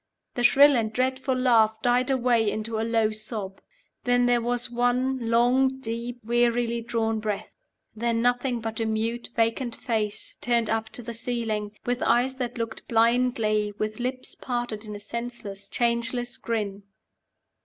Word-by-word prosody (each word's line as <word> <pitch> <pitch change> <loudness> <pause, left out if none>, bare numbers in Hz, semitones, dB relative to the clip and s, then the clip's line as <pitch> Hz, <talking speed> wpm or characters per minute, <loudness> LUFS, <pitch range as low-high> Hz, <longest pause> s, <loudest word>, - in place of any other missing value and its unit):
The 245 - -2
shrill 280 +3 +7
and 220 -2 0
dreadful 260 +2 0
laugh 225 -4 +3
died 250 +2 +2
away 240 -4 +2
into 220 +1 -3
a - - 0
low 225 -1 +2
sob. 215 -3 -6 0.4
Then 245 0 +3
there 245 -1 +3
was 245 +1 0
one 245 0 0
long, 255 +3 +3
deep, 235 0 -4
wearily 235 0 +1
drawn 225 -1 -1
breath. 210 -2 -3 0.4
Then 230 +1 0
nothing 245 0 +1
but 225 0 -4
a 225 - 0
mute, 225 +2 -2
vacant 230 +1 0
face 215 -4 -2
turned 235 -2 +1
up 225 0 -1
to 245 - -3
the 235 +1 -6
ceiling, 225 -3 -2
with 245 +1 -1
eyes 250 +2 +3
that 250 -1 -3
looked 230 -1 -5
blindly, 225 -3 +2
with 215 +1 -3
lips 255 +1 -3
parted 240 -4 -4
in 210 -1 -6
a - - -7
senseless, 205 -3 -7
changeless 240 +1 0
grin. 205 -3 -3
235 Hz, 155 wpm, -26 LUFS, 220-245 Hz, 0.4 s, shrill